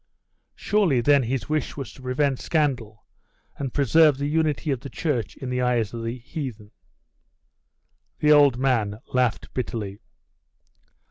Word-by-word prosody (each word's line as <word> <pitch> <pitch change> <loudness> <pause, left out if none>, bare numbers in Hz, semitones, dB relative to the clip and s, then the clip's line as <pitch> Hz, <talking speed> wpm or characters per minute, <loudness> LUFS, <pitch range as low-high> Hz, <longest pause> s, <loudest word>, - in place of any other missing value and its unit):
'Surely 195 - +2
then 140 +3 +4
his 130 +1 -2
wish 155 -2 -2
was 135 - -6
to - - -15
prevent 130 +1 0
scandal, 130 - -1 0.5
and 135 -2 -4
preserve 145 +2 +4
the 140 - -2
unity 150 -2 0
of 135 - -1
the 140 - -9
church 125 - -2
in 130 -2 -6
the 125 0 0
eyes 120 -4 0
of 115 -1 -5
the 115 +2 -3
heathen.' 120 -5 -7 1.5
The 150 - +3
old 145 -4 +6
man 115 -6 0
laughed 125 -3 0
bitterly. 105 -5 -4
130 Hz, 140 wpm, -24 LUFS, 115-145 Hz, 1.5 s, old